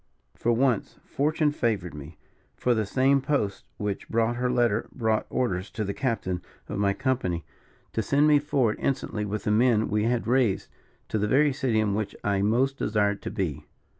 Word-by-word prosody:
For 120 - 0
once, 120 -2 +1
fortune 150 +2 +1
favoured 110 - -1
me; 75 +2 -10 0.4
for 125 - +1
the 110 -3 0
same 135 +5 +3
post 130 -9 -1
which 105 -2 -4
brought 115 +1 +1
her 125 0 0
letter 120 -3 +1
brought 110 -3 0
orders 95 -7 -1
to 110 - -2
the 100 -1 -2
captain 110 -9 -2 0.3
of - - -4
my 100 -1 +3
company 120 -10 -1 0.5
to 110 - 0
send 140 +7 +3
me 150 -1 +6
forward 130 -6 +1
instantly 110 -5 -1
with 105 0 -3
the 105 - 0
men 110 0 +3
we 105 0 +1
had 120 0 0
raised, 120 -5 +1 0.4
to 110 - 0
the 105 - +1
very 140 +5 +4
city 130 -5 0
in 105 -2 +1
which 105 0 -2
I 100 -1 +1
most 125 +7 +2
desired 105 -1 +1
to - - -4
be. 80 -8 -3
110 Hz, 185 wpm, -26 LUFS, 100-130 Hz, 0.5 s, me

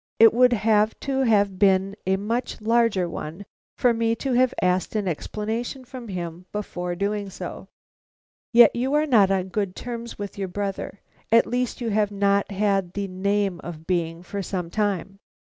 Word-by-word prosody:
It 225 0 +7
would 250 +1 +5
have 215 -1 +2
to 270 -1 -1
have 205 -6 +2
been 195 0 +3
a 190 - +3
much 230 +5 -3
larger 225 -4 +2
one 170 +3 -7 0.3
for 245 -1 +3
me 230 0 +1
to 265 +2 -2
have 255 0 +4
asked 180 +3 0
an 210 -3 0
explanation 220 - -3
from 250 -1 -9
him 175 -2 -6
before 180 -4 -4
doing 200 +1 -2
so." - - -7 0.8
"Yet 235 0 +7
you 260 +4 0
are 300 +1 +3
not 220 -9 +5
on 190 -1 0
good 195 -1 -2
terms 235 -1 -6
with 205 0 -6
your 195 - -2
brother; 200 +1 -4 0.3
at 230 +1 +6
least 250 0 -2
you 235 - -1
have 205 0 +2
not 200 0 +1
had 195 -3 0
the 200 -1 -3
name 195 0 -1
of 160 -2 -8
being, 170 -1 -1
for 200 +2 -5
some 180 -2 -4
time?" 195 -2 -1
205 Hz, 175 wpm, -24 LUFS, 190-230 Hz, 0.8 s, It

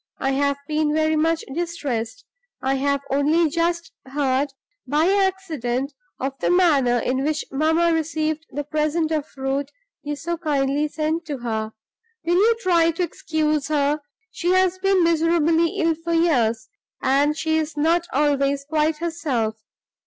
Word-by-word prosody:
I 270 - 0
have 280 +1 +1
been 305 -1 0
very 315 0 +2
much 325 +1 +1
distressed; 315 - -3 0.3
I 265 +1 0
have 280 +1 0
only 300 +3 +2
just 340 +1 -1 0.2
heard, 270 0 0 0.4
by 300 +5 +2
accident, 325 -10 0 0.3
of 265 +1 -2
the - - 0
manner 295 -9 +4
in 260 +3 -1
which 305 +1 -1
mamma 320 +4 +2
received 315 0 -1
the 290 - -4
present 310 +2 0
of 305 -2 -1
fruit 270 +1 -3 0.3
you 295 0 -4
so 340 +4 -3
kindly 290 -2 0
sent 315 +2 -2
to 290 -3 -3
her. 220 -3 -3 0.5
Will 340 - +2
you 450 +4 +4
try 340 -4 +3
to 335 +2 -1
excuse 310 -3 -1
her? 295 0 +1 0.3
She 350 +1 -1
has 370 0 +2
been 390 -1 +3
miserably 330 0 +2
ill 330 -1 +2
for 330 +1 -4
years, 235 -10 +2 0.4
and 285 +3 +2
she 320 0 +1
is 305 -1 -4
not 335 +3 +2
always 280 0 +1
quite 305 +1 +1
herself. 270 -10 -2
305 Hz, 150 wpm, -22 LUFS, 280-330 Hz, 0.5 s, manner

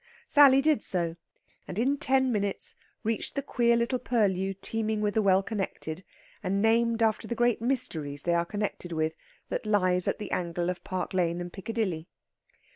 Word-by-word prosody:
Sally 275 - +6
did 300 -6 +3
so, 170 -3 -1 0.5
and - - -6
in 265 +5 +2
ten 265 -2 +2
minutes 200 -3 -1 0.3
reached 225 0 -2
the 280 - -1
queer 235 -3 +2
little 235 +2 0
purlieu 195 -6 0
teeming 220 +2 -2
with 210 -1 0
the 220 - +2
well 195 -1 +4
connected, 190 -5 -4 0.4
and 195 0 0
named 230 +1 +3
after 220 -2 +1
the 235 - -3
great 240 -1 +2
Mysteries 160 - -1
they 175 - +1
are 170 0 +2
connected 205 -2 -4
with, 160 -1 -1 0.3
that - - -3
lies 185 -4 +2
in - - +1
the 210 - -6
angle 175 0 -1
of 180 - -8
Park 185 0 -4
Lane 175 -2 +1
and 175 0 -6
Piccadilly. 195 -6 -3
205 Hz, 175 wpm, -28 LUFS, 180-235 Hz, 0.5 s, Sally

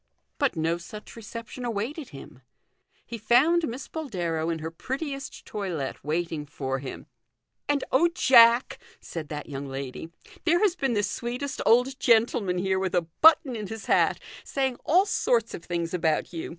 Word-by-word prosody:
But - - +1
no 165 +2 0
such 210 +5 -10
reception 230 +2 -8
awaited 240 +6 -3
him. 135 -2 -12 0.6
He 230 - -7
found 290 +10 +4
Miss 250 +4 -6
Boldero 175 - -3
in 165 - -1
her 160 +1 -5
prettiest 275 - -5
toilette 175 -10 -4
waiting 155 0 -2
for 135 -2 -3
him. 135 0 -8 0.3
" - - -49
And 285 -2 +1
oh, 325 +7 +5
Jack," 245 -7 +5 0.2
said 160 -3 -7
that 150 -1 -6
young 140 -1 -6
lady, 135 +3 -6 0.2
" - - -20
there 340 +1 +4
has 405 -5 +3
been 270 -8 0
the 205 -2 +1
sweetest 245 +6 -3
old 250 +4 +4
gentleman 220 -5 +3
here 190 +1 0
with 190 -1 -1
a 175 - +3 0.2
button 300 -5 +6
in 210 -2 -5
his 220 +2 -7
hat, - - +3 0.2
saying 265 -3 -1
all 365 +5 +4
sorts 235 - +1
of 165 - -7
things 170 0 -3
about 165 -2 0
you. 165 - -5
215 Hz, 170 wpm, -26 LUFS, 165-265 Hz, 0.6 s, button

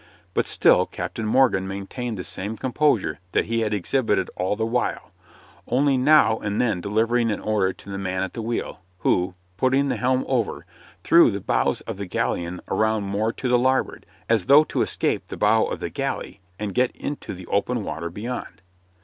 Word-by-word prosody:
But - - 0
still - - +4
Captain 110 - -5
Morgan 110 -6 +3
maintained 100 +4 -5
the 90 - -4
same 105 +6 -4
composure 125 - +1
that - - +2
he 115 +1 -1
had 110 -2 0
exhibited 105 -1 0
all 95 +3 -1
the 110 +1 -1
while, 120 +2 -2 0.6
only 135 +3 +2
now 130 -4 +5
and 105 0 -2
then 110 -8 +1
delivering 115 +4 +1
an 105 - -1
order 105 -3 +1
to 95 - -16
the 95 - -4
man 95 -1 -2
at 95 - -5
the 115 - -5
wheel, 115 -3 -3 0.2
who, 90 0 +1 0.2
putting 135 +6 +2
the - - -1
helm 130 +1 +1
over, 125 -5 -1 0.4
threw - - +6
the - - -3
bows - - 0
of - - -6
the 100 -1 -5
galleon 90 0 -2
around 110 -1 +1
more 100 +3 -1
to 130 - -4
the 125 0 +4
larboard, 130 +1 0 0.2
as 115 -3 +1
though 140 +3 +8
to - - -2
escape - - -1
the - - -7
bow - - +3
of - - -4
the - - -4
galley - - -4 0.2
and 105 -1 -4
get 125 0 +2
into 145 - -5
the 90 0 -10
open 110 +5 0
water 85 -2 -4
beyond. 105 -3 -6
110 Hz, 190 wpm, -23 LUFS, 95-125 Hz, 0.6 s, though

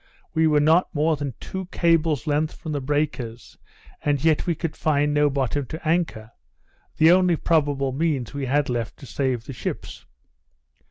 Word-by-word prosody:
We 160 0 +3
were 150 -1 +4
not 160 +4 +3
more 155 +2 +2
than 140 -5 -5
two 190 -1 -6
cables 165 -7 +1
length 150 +1 0
from 160 - -7
the 145 -2 -2
breakers; 130 -5 -3 0.4
and 145 -1 0
yet 160 0 +2
we 170 - +1
could 165 0 -4
find 150 -1 +1
no 150 0 +3
bottom 135 0 -1
to 160 +3 -7
anchor, 160 -10 -1 0.7
the 160 +2 +6
only 180 -1 +4
probable 145 -4 +1
means 140 -4 -1
we 140 -2 -3
had 145 +2 +1
left 120 -3 -3
to - - -12
save 130 -3 -2
the 135 - -7
ships. - - -6
150 Hz, 170 wpm, -24 LUFS, 135-160 Hz, 0.7 s, the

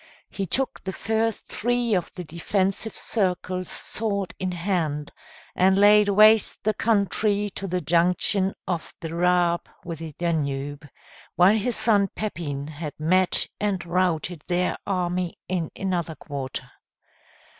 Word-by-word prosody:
He 195 -1 -3
took 265 +9 -1
the 190 - -3
first 220 +2 -1
three 240 0 0
of 180 -3 0
the 180 - -5
defensive 190 +6 -1
circles 185 -3 -1
sword 200 -4 -2
in 185 -1 -1
hand, 170 -5 -2 0.4
and 190 +1 +4
laid 205 +1 +6
waste 215 +2 +5
the 215 - +2
country 205 -1 +1
to 195 - -5
the 180 0 -1
junction 180 +4 +2
of 175 -4 -3
the 165 -1 -6
Raab 175 0 +2 0.2
with 165 -2 -5
the 160 -2 -7
Danube, 145 -3 -2 0.5
while 185 +4 +6
his 225 +3 +1
son 210 -3 +4
Pepin 150 -10 -4
had 150 0 -7
met 185 +4 +2
and 195 -4 -1
routed 175 -2 0
their 180 0 +1
army 180 -2 -1
in 175 -4 -1
another 175 -4 -2
quarter. 140 -4 -6
180 Hz, 135 wpm, -25 LUFS, 170-205 Hz, 0.5 s, laid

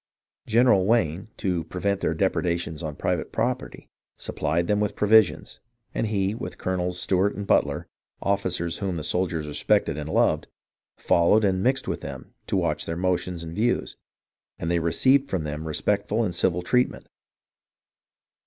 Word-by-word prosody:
General 115 -3 +4
Wayne, 95 -6 +1
to 90 -5 -1
prevent 100 +2 -1
their - - 0
depredations 85 -2 -1
on 80 -3 -4
private - - -2
property, - - -2 0.3
sup - - -6
plied 80 +3 +1
them 105 +3 +1
with 105 -1 -1
provisions, 105 -1 +3 0.3
and 115 - -1
he, 100 -2 0
with 115 - -6
Colonels 90 -1 -2
Stewart 95 +3 +1
and 100 - -5
Butler, - - +1 0.3
officers 90 -4 -1
whom 95 -4 -2
the 80 - -4
soldiers 85 -2 -1
respected 75 0 +1
and 75 +1 -5
loved, - - +2 0.5
followed 85 +6 +3
and 95 -2 +2
mixed 130 +5 +1
with - - -3
them - - -8
to - - 0
watch - - -1
their 80 0 -3
motions 90 -1 -1
and 80 0 -7
views, 120 +5 0 0.6
and 85 - -2
they 85 - +2
received 130 +12 +3
from 90 -4 -1
them 75 +1 -5
respectful 105 +7 0
and 95 -5 -1
civil 90 0 +1
treatment. 125 +6 +1
90 Hz, 155 wpm, -25 LUFS, 85-105 Hz, 0.6 s, General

